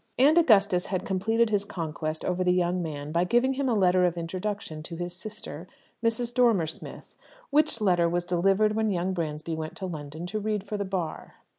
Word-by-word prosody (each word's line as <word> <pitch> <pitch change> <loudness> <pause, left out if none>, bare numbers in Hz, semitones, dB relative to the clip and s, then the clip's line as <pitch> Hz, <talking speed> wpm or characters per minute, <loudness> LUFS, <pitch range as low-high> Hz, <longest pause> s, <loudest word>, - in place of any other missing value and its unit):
And 280 +5 +5
Augustus 205 - +4
had 185 -1 -2
completed 220 +4 +1
his 205 -1 +2
conquest 160 -5 -4
over 185 0 0
the 180 - +3
young 180 0 +1
man 150 -3 -5
by 170 +2 +2
giving 240 +7 +2
him 270 0 -1
a 235 - +2
letter 185 -2 +4
of 175 -1 +1
introduction 180 -1 -4
to 170 +2 -7
his 175 +1 -5
sister, 190 -5 -7 0.4
Mrs. 230 +1 +1
Dormer 235 -9 +4
Smith, 160 - -8 0.4
which 300 -4 +3
letter 175 -5 +3
was 175 +1 -1
delivered 195 +4 +2
when 220 0 +1
young 185 -1 -1
Bransby 160 -2 -3
went 160 0 -5
to 195 - -4
London 155 -1 -6
to 215 +4 -3
read 210 -1 -2
for 210 +1 -5
the 200 -1 -2
Bar. 185 -5 -4
185 Hz, 195 wpm, -27 LUFS, 170-215 Hz, 0.4 s, And